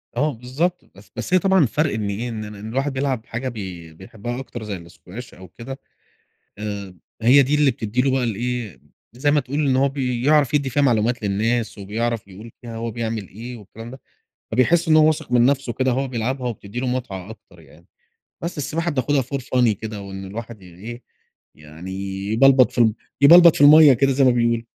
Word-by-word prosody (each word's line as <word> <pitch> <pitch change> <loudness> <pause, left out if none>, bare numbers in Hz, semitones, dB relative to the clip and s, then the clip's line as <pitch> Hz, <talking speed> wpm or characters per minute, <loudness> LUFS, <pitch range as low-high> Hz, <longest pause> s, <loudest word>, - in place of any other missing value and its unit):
آه 145 +4 0
بالضبط، 135 +10 -3
بس 100 0 -17
بس 185 - -4
هي 185 - +6
طبعًا 190 0 +3
الفرق 150 +1 +1
إن 105 -2 -2
إيه، 110 +5 -4
إن 110 -2 -5
الواحد 125 +8 -3
بيلعب 130 -4 -2
حاجة 125 +3 -4
بي 90 -8 -8
بيحبها 110 +8 -7
أكتر، 125 -3 -8
زي 100 -5 -6
الSquash 95 +7 -11
أو 95 0 -13
كده. 125 - -9 0.8
آآ 100 -3 -6 0.3
هي 130 +5 +6
دي 140 +3 +1
اللي 150 -2 +3
بتدّي 115 +1 -2
له 135 +1 +1
بقى 130 -1 0
الإيه، 120 -2 -3 0.3
زي 135 +4 0
ما 150 - +3
تقول 140 +2 -4
إن 130 - +2
هو 135 +1 +3
بيعرف 135 +2 +1
يدّي 140 -2 +1
فيها 145 +3 +1
معلومات 120 -2 +1
للناس، 110 +4 -1
وبيعرف 110 +2 -3
يقول 105 +4 -12
فيها 115 -2 -8
هو 115 +1 -4
بيعمل 110 -3 -4
إيه 120 +5 -9
والكلام 115 +2 -11
ده. 130 - -12 0.5
فبيحس 165 +9 +2
إن 155 - +5
هو 155 -1 +6
واثق 155 -4 -1
من 120 0 +5
نفسه 135 -2 0
كده 130 0 0
وهو 135 +1 -1
بيلعبها، 125 +1 -2
وبتدّي 115 0 -6
له 130 - -2
متعة 110 -7 -4
أكتر 110 - -15
يعني. - - -20 0.5
بس 170 -1 -5
السباحة 165 +4 -2
بناخدها 140 -1 0
for 135 +3 -4
funny 125 -1 +1
كده، 110 -2 -6
وإن 95 0 -8
الواحد 110 +1 -8
إيه 100 +8 -10 0.5
يعني 80 +4 -11 0.4
يبلبط 130 0 +5
في - - -10
ال 110 -3 +4 0.3
يبلبط 170 +3 +8
في - - +1
المَيّة 150 0 +9
كده، 135 +2 +2
زي 135 +1 +3
ما 130 - +6
بيقولوا. 115 -1 +1
120 Hz, 195 wpm, -21 LUFS, 110-135 Hz, 0.8 s, المَيّة